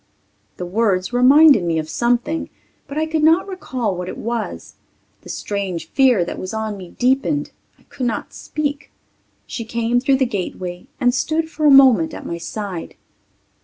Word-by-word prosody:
The 180 - -4
words 190 +1 0
reminded 270 - +6
me 165 -2 0
of 155 -1 -2
something, 240 - -1 0.4
but 280 +1 -7
I 315 - +1
could 315 0 -1
not 325 +5 +4
recall 255 - -3
what 180 +1 -5
it - - -7
was. 230 -1 -4 0.5
The - - -14
strange 185 -5 -4
fear 250 -10 +4
that - - -6
was 185 +3 -5
on 220 -1 -3
me 185 -3 -11
deepened. 270 +3 +1 0.3
I - - -27
could 255 - -4
not 235 - -4
speak. 290 -1 -4 0.5
She 230 - -5
came 235 +1 0
through 265 +1 +2
the 265 - +2
gateway 185 -2 -5
and 245 -2 +3
stood 320 +4 -1
for 305 -2 +1
a - - +7
moment 260 - +6
at - - -9
my 170 - -4
side. 190 -1 -6
240 Hz, 170 wpm, -20 LUFS, 185-275 Hz, 0.5 s, a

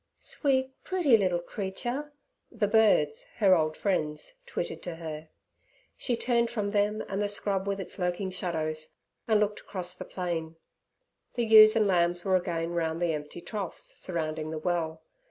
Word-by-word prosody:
'Sweet, 265 -2 0
pretty 350 -10 +4
little 185 -5 +2
creature' 240 +10 -4 0.4
the 225 -4 0
birds, 225 - +3
her 195 -4 +6
old 155 -2 0
friends, 155 - -1
twittered 480 - -4
to 175 -2 -5
her. 160 -1 -7 0.7
She 240 -3 -1
turned 235 -1 +2
from 210 -4 -2
them 210 +1 +1
and 195 +1 -2
the 205 - +1
scrub 200 -1 -2
with 200 0 -1
its 190 +1 -7
lurking 180 +1 -1
shadows, 155 -4 -2 0.3
and 220 -2 +4
looked 210 0 0
across 180 -2 -3
the 185 - -8
plain. 165 -3 -3 0.8
The 240 - +1
ewes 215 0 +9
and 220 -2 +4
lambs 175 -2 +2
were 190 -1 +3
again 170 -2 -1
round 165 -1 -1
the 175 -2 +1
empty 150 +3 -6
troughs 200 -3 -5
surrounding 155 -3 -3
the 160 - -4
well. 160 -1 -2
185 Hz, 160 wpm, -29 LUFS, 165-215 Hz, 0.8 s, ewes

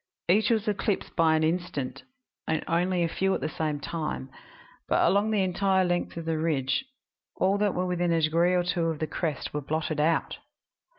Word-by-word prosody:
Each 205 +5 +4
was 220 -2 +1
eclipsed 205 -1 -1
but 160 -2 +4
an 155 - +1
instant, 160 -5 -2 0.5
and 160 -1 0
only 175 +1 +1
a - - +2
few 190 +3 0
at - - -2
the - - -1
same 155 -2 -2
time, 155 -4 -4 0.6
but - - +3
along 200 +3 +3
the 210 -3 +2
entire 190 +1 +2
length 175 -1 -1
of 165 - -5
the 160 -1 -1
ridge 150 - 0 0.5
all 195 +2 +2
that 205 -2 +1
were 180 - 0
within 175 -1 0
a 165 - +3
degree 165 +3 +3
or 180 - +2
two 175 -1 0
of 165 -1 -1
the 155 - -1
crest 155 -2 -3
were 150 - -2
blotted 155 +1 -2
out. 160 +2 +1
170 Hz, 195 wpm, -27 LUFS, 155-185 Hz, 0.6 s, Each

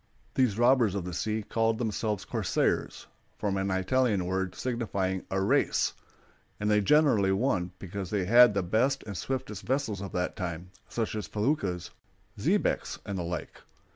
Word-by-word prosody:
These 125 -6 +2
robbers 120 -4 +4
of 95 -3 -3
the 90 - -5
sea 110 +5 -1
called 115 +1 +1
themselves 110 -3 -2
corsairs, - - -1 0.3
from 100 -2 -1
an 95 0 -1
Italian 100 +1 +1
word 95 0 -2
signifying 100 -7 -2
"a 95 - 0
race"; 95 - +2 0.7
and 105 +1 0
they 105 0 +4
generally 115 -5 +4
won, 95 -4 +1
because 95 0 -6
they 100 -3 0
had 120 +1 +7
the 100 - +1
best 125 +10 +1
and 100 -2 -7
swiftest 125 -2 -4
vessels 125 -7 -1
of 100 - -6
that 90 0 -1
time, 90 -2 -5 0.2
such 115 -2 -2
as 105 -5 -4
feluccas, 105 - -1 0.4
xebecs, - - 0
and 100 - -4
the - - -2
like. 85 -1 -5
100 Hz, 160 wpm, -29 LUFS, 95-115 Hz, 0.7 s, had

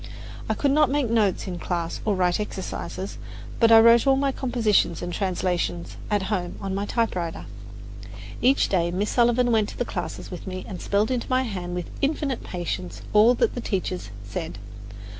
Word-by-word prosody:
I - - +1
could 280 - +1
not 300 -1 +4
make 275 -4 0
notes 210 -5 +2
in 180 -3 -5
class 170 -2 -3
or 210 -2 +2
write 180 0 +1
exercises; 195 -1 -5 0.4
but 230 -1 +5
I 225 - +10
wrote 230 +2 +6
all 270 - +6
my 275 0 +1
compositions 225 - +1
and 175 0 -4
translations 170 - -1
at 205 -2 +1
home 185 -3 -2
on 195 -1 -4
my 200 +1 -2
typewriter. 185 -9 -2 1.0
Each 265 +3 +4
day 170 -3 +1
Miss 195 +4 -1
Sullivan 240 0 +3
went 220 -2 +2
to - - -10
the 245 - -1
classes 175 -2 -5
with 180 0 -8
me 185 0 -5
and 185 - -7
spelled 205 +4 +1
into 250 -2 -2
my 255 0 +2
hand 180 -7 -4
with 180 -1 -5
infinite 280 -2 -1
patience 180 0 -5
all 220 +4 +6
that - - +1
the 245 - -4
teachers 185 - -3
said. 105 +8 -5
205 Hz, 180 wpm, -25 LUFS, 180-240 Hz, 1.0 s, I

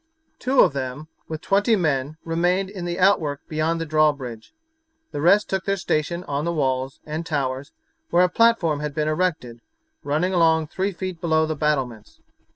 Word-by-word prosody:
Two 260 +1 +3
of 165 - +4
them, 140 +3 -5 0.2
with 160 -1 -5
twenty 205 +4 +3
men, 150 -5 -1
remained 175 +4 0
in 185 -4 -6
the 175 0 -3
outwork 165 -7 +2
beyond 160 +2 -1
the 165 - -2
drawbridge. 145 -7 0 0.6
The 145 - -4
rest 200 +6 +4
took 190 -1 -2
their 195 0 0
station 170 0 -1
on 145 -3 -3
the 170 - -1
walls, 135 -4 -1
and 155 +2 -4
towers, 140 -3 -3 0.4
where 175 +1 +4
a - - +5
platform 180 -7 +3
had 150 -1 -4
been 155 -1 0
erected, 155 -8 -1 0.4
running 155 +6 0
along 160 -3 +3
three 190 +4 -1
feet 180 -1 -6
below 160 -2 +2
the 155 0 -3
battlements. 135 -8 -2
160 Hz, 170 wpm, -23 LUFS, 145-180 Hz, 0.6 s, a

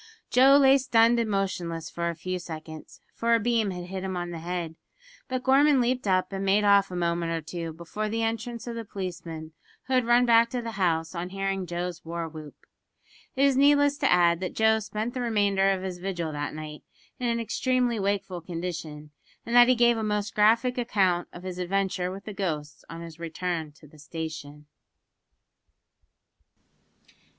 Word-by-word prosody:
Joe 270 +3 +7
lay 270 0 +6
stunned 235 -2 +4
and 230 -2 0
motionless 175 -5 -2
for 170 0 -2
a 170 - -4
few 185 +3 -4
seconds, 160 -2 -9
for 230 0 +2
a - - +2
beam 230 -2 +1
had 180 -1 -5
hit 190 +1 -6
him 190 -1 -3
on 175 0 -4
the 170 - -6
head; 170 -1 -4 0.5
but 255 -1 -3
Gorman 275 +1 +5
leaped 250 -1 0
up 185 +1 +1
and 195 0 -3
made 195 +2 +3
off 200 -1 +4
a 180 - -6
moment 170 -1 -1
or 165 - -1
two 165 +1 -5
before 170 +7 -5
the 225 +1 -1
entrance 230 +1 -3
of 240 - -5
the 230 0 -5
policeman, 170 -6 -6 0.3
who 265 - -3
had 255 -2 +2
run 240 +1 +5
back 230 -1 +5
to 245 0 -3
the 230 - -4
house 170 -5 0
on 175 0 -4
hearing 195 -1 -2
Joe's 175 0 -4
war 170 0 -4
whoop. 155 -2 -10 0.8
It 270 +1 +3
is 275 -2 +3
needless 285 +1 +4
to 275 - +2
add 170 -1 +4
that 185 - -4
Joe 220 0 +3
spent 215 +2 -4
the 255 - -3
remainder 205 -4 +2
of 190 -1 0
his 185 -2 -5
vigil 175 -4 -3
that 145 0 -4
night 155 -1 -8 0.4
in 250 - -1
an 235 0 0
extremely 245 0 0
wakeful 195 -2 -2
condition, 165 -3 -6 0.3
and 235 - -2
that 240 0 +8
he 255 - +4
gave 240 -1 +4
a 220 - -2
most 210 -1 -1
graphic 230 +4 +3
account 190 -7 +1
of 175 - -11
his 185 -1 -6
adventure 185 0 -1
with 195 +2 -8
the 215 - -6
ghosts 155 -7 -4
on 165 +2 -8
his 165 -1 -10
return 170 -1 -3
to 150 - -18
the 150 +1 -18
station! 150 -1 -7
190 Hz, 190 wpm, -27 LUFS, 170-230 Hz, 0.8 s, that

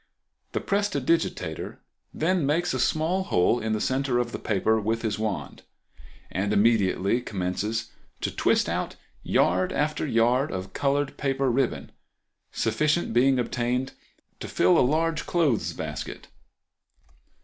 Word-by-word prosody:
The - - 0
prestidigitateur 170 -6 -1 0.3
then 180 +1 0
makes 160 +4 +1
a 130 - -1
small 160 +8 +1
hole 90 - +2
in 110 -1 -1
the 110 - 0
center 130 +2 0
of 120 -1 0
the - - -5
paper 110 +2 +1
with 110 +2 -1
his 110 -1 -1
wand, 110 -2 -3 0.7
and 100 +2 -1
immediately 105 0 +2
commences 105 +3 -3 0.3
to - - -1
twist - - +2
out - - -2 0.3
yard 90 +2 +2
after 150 +1 -1
yard 125 +3 +2
of 95 0 -5
colored 140 0 0
paper 135 -2 0
ribbon, 130 0 -1 0.6
sufficient 150 +5 0
being 130 +3 +4
obtained 125 +2 -1 0.5
to - - -6
fill 90 +1 +3
a - - +5
large 155 +4 +1
clothes 155 - +1
basket. - - -6
125 Hz, 130 wpm, -26 LUFS, 110-145 Hz, 0.7 s, a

